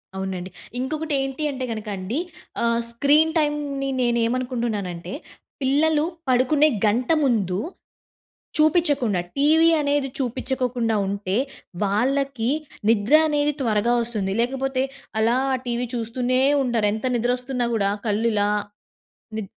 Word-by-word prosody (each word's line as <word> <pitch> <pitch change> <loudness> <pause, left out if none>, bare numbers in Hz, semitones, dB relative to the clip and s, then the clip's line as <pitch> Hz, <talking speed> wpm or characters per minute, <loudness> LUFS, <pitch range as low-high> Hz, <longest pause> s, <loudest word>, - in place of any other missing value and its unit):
అవునండి. 190 -1 -4 0.3
ఇంకొకటి 305 +4 -2
ఏంటి 270 +3 -3
అంటే 260 -2 -5
కనుక 215 -1 -5
అండి 205 - -3 0.4
ఆహ్, 235 0 +2
స్క్రీన్ 295 +6 +4
టైంని 290 -2 -1
నేను 240 -1 +2
ఏమనుకుంటున్నానంటే, 230 -8 -2 0.5
పిల్లలు 295 +3 +2 0.2
పడుకునే 280 +5 +4 0.2
గంట 240 +6 +1
ముందు 200 -8 +1 1.0
చూపించకుండా, 295 - +3 0.2
టీవీ 320 +3 +5
అనేది 285 -1 0
చూపించకోకుండా 250 -2 -1
ఉంటే 200 0 -2 0.5
వాళ్ళకి 255 +3 0 0.4
నిద్ర 220 +3 +2
అనేది 295 -1 +1
త్వరగా 230 0 +2
వస్తుంది. 215 -5 -2
లేకపోతే 265 +1 -1 0.4
అలా 230 +2 +3 0.2
అ - - -1
టీవీ 245 0 -1
చూస్తూనే 245 +2 0 0.2
ఉంటారు. 235 -4 +1
ఎంత 220 +4 -4
నిద్రొస్తున్నా 245 +1 0
కూడా 200 -2 +1 0.2
కళ్ళు 215 +3 +1
ఇలా 205 0 +2 0.9
ని 220 - -2
250 Hz, 115 wpm, -23 LUFS, 220-275 Hz, 1.0 s, టీవీ